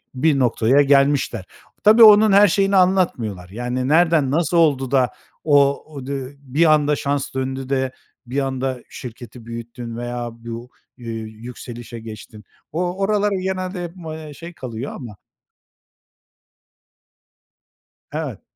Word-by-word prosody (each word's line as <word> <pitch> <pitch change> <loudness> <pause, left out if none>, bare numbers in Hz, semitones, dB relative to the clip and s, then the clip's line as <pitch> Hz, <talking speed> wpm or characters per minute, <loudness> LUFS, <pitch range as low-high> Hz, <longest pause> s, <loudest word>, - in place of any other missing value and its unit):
bir 140 +2 +2
noktaya 125 +2 +3
gelmişler. 140 -7 +2 0.4
Tabii, 220 +2 +7
onun 215 0 +8
her 200 +1 +7
şeyini 195 +2 +2
anlatmıyorlar. 170 - +1
Yani, 125 +4 -3
nereden 160 -3 +3
nasıl 170 +3 +1
oldu 140 -6 +2
da 130 -3 +3 0.3
o 140 -2 +3
o 140 -3 -7
di 135 0 -5
bir 150 +4 +3
anda 150 -1 +2
şans 140 0 -2
döndü 130 0 -3
de 130 -1 0 0.3
bir 125 +3 -2
anda 130 -2 -2
şirketi 120 -1 -10
büyüttün 115 0 -7
veya 120 0 -4
bu, 115 +1 -8 0.3
ııı, 120 - -10
yükselişe 115 +1 -9
geçtin? 110 -1 -11 0.3
O 175 +3 -2
oralar 205 +1 +1
genelde 185 -1 -3
hep, 170 -1 -6
eee, 160 -3 -8
şey 170 +4 -10
kalıyor 125 -3 -6
ama 115 -6 -9 2.9
Evet. - - -5
135 Hz, 125 wpm, -21 LUFS, 120-165 Hz, 2.9 s, onun